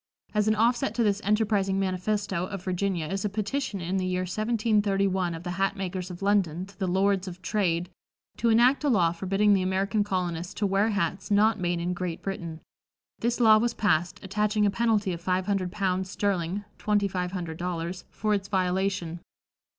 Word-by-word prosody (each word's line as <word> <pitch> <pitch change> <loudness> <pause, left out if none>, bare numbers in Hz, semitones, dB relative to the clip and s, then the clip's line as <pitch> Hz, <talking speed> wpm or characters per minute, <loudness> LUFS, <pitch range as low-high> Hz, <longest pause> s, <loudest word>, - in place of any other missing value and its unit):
As 210 -1 +2
an 215 - +3
offset 240 +5 +1
to 240 - +2
this 205 -1 +1
enterprising 205 -2 +1
manifesto 190 -1 -1
of 195 -2 -6
Virginia 185 -2 -1
is 195 +4 -3
a 210 - 0
petition 215 +2 -2
in 180 +3 -1
the 185 - 0
year 185 0 0
1731 200 -3 +1
of 165 - -8
the 175 - -4
hat 195 0 +2
makers 185 -2 -4
of 180 +1 -8
London 185 -4 +1
to 195 -1 -18
the 190 - 0
"Lords 190 +1 +1
of 180 0 -7
Trade," 175 -5 0 0.5
to 235 - +2
enact 245 +6 +4
a 290 - +2
law 180 -9 +3
forbidding 195 +4 +2
the 195 - +3
American 195 +3 +1
colonists 180 -3 -3
to 205 - 0
wear 200 +3 +2
hats 185 -2 -1
not 210 +1 +3
made 175 -1 0
in 175 +1 -1
Great 175 -2 -4
Britain. 170 -5 -5 0.6
This 240 +1 0
law 220 -2 +7
was 235 +1 0
passed, 175 -2 +1
attaching 210 +2 +1
a 200 - +3
penalty 210 -3 +1
of 170 - -6
five 185 +1 0
hundred 195 -3 -1
pounds 190 -2 -1
sterling 195 -1 -1 0.2
(twenty 205 -1 +2
five 180 -1 -3
hundred 170 -4 -4
dollars) 175 +1 -4
for 215 0 -1
its 200 -1 -1
violation. 185 -2 -1
195 Hz, 190 wpm, -27 LUFS, 180-210 Hz, 0.6 s, law